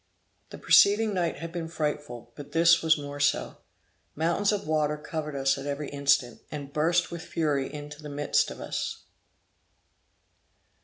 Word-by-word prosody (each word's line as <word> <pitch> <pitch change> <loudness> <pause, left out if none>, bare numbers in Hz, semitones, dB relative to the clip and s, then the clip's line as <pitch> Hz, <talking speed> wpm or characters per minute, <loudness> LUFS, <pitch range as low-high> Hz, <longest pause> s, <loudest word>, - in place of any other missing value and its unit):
The - - -9
preceding 210 +1 +5
night 175 -3 0
had 165 0 -6
been 170 -2 -4
frightful, 150 -7 -4
but 145 - -10
this 170 +1 +5
was 160 -1 +4
more 145 0 -7
so. 145 0 +1 0.6
Mountains 170 +6 +1
of 205 -2 -2
water 150 -1 +1
covered 150 0 -5
us 135 0 +1
at 135 - -6
every 145 +1 -3
instant, 140 -3 +1
and 140 -2 -7
burst 165 +3 +1
with 170 -1 -5
fury 145 -6 -1
into 150 0 -8
the 150 - -8
midst 145 0 +1
of - - -9
us. - - -4
150 Hz, 155 wpm, -27 LUFS, 145-165 Hz, 0.6 s, preceding